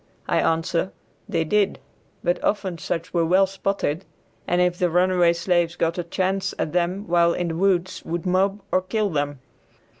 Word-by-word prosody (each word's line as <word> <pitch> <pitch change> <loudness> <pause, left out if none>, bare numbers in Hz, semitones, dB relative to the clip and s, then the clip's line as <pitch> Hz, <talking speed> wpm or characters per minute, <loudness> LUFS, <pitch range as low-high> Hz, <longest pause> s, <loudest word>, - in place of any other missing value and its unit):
I - - +2
answer, 165 +3 0 0.4
they 165 - +1
did; 200 +4 +1 0.5
but 175 0 0
often 190 -5 -1
such 170 +1 -4
were 170 -1 +2
well 185 +4 +4
spotted, 195 -3 -2 0.4
and 175 - +2
if 180 0 +2
the 180 - +2
runaway 180 0 +4
slaves 175 0 +1
got 170 0 0
a - - -1
chance 190 +2 -1
at 155 - -2
them 180 +3 0
while 170 0 +3
in 175 -1 -1
the 165 - -3
woods 185 0 +1
would 170 +2 -4
mob 195 +3 +1
or 185 - +3
kill 205 +2 -1
them. 145 -3 -2
180 Hz, 175 wpm, -23 LUFS, 170-190 Hz, 0.5 s, well